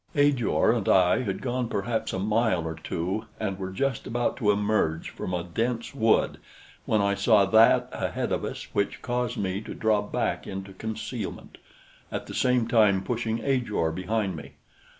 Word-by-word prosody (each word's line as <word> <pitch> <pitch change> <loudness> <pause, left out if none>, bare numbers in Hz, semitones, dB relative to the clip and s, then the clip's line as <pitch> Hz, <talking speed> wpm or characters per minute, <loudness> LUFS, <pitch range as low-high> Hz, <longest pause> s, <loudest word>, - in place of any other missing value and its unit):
Ajor 145 -7 +3
and 115 -5 -1
I 90 +5 +4
had 100 -6 -3
gone 125 -2 -1
perhaps 110 +2 -1
a - - -2
mile 105 -2 +1
or 80 - -3
two 90 +6 -3
and 100 -3 -3
were 95 -1 -4
just 135 +5 -2
about 120 0 0
to 110 -6 +1
emerge 105 -6 +1
from - - -5
a 90 -2 -1
dense 115 +8 -2
wood 115 -5 +2 0.5
when 110 - +3
I 100 0 +2
saw 105 0 +4
that 110 +3 +5
ahead - - -2
of - - 0
us - - -4
which 100 - -1
caused 125 0 -1
me 95 0 -2
to - - -8
draw 110 -2 +2
back 105 - -2
into 95 0 -6
concealment, 110 +3 -6 0.5
at - - -4
the - - -8
same 125 -2 +2
time 105 -5 +4
pushing 115 -2 -2
Ajor 120 -12 0
behind 95 +2 -1
me. 80 - -9
110 Hz, 170 wpm, -26 LUFS, 95-120 Hz, 0.5 s, that